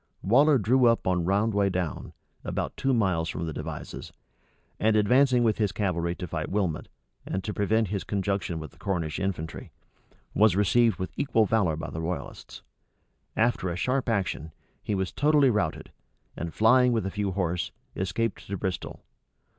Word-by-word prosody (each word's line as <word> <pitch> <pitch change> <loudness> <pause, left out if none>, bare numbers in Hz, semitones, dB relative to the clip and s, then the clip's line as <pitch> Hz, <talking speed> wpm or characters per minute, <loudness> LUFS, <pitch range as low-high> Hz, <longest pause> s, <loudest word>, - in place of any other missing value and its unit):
Waller 140 +8 +5
drew 125 +3 +3
up 115 0 +2
on 90 -2 +1
Roundway 100 +1 +2
Down, 90 -4 -3 0.3
about - - -3
two 135 - 0
miles 95 -9 +1
from 85 - -3
the 80 - -4
Devizes, - - -7 0.7
and 110 0 +3
advancing 125 +4 +4
with 110 -2 +1
his 105 -3 +1
cavalry 90 -3 -1
to 90 - -5
fight 85 - -4
Wilmot, 95 -6 -1 0.4
and 95 - -3
prevent 110 +1 +1
his 100 -1 -2
conjunction 100 -4 -2
with 80 -4 -7
the - - -23
Cornish 85 -5 -2
infantry, 90 -5 -4 0.6
was 105 -3 +4
received 105 +1 +3
with 95 - -5
equal 115 -6 +2
valor 100 -7 +2
by 80 - -6
the 80 - -4
royalists. 80 -3 -6 0.7
After 115 -5 +1
a 85 - -3
sharp 130 +7 0
action, 90 - -1 0.3
he 105 - -2
was 95 -2 -1
totally 145 -2 +4
routed, 105 -8 -2 0.4
and 85 0 -4
flying 125 +5 +4
with 110 -3 0
a 95 - -2
few 100 -2 -2
horse, 85 -4 -1 0.3
escaped 100 +4 -2
to 100 - -3
Bristol. 95 -1 -4
100 Hz, 160 wpm, -27 LUFS, 90-115 Hz, 0.7 s, Waller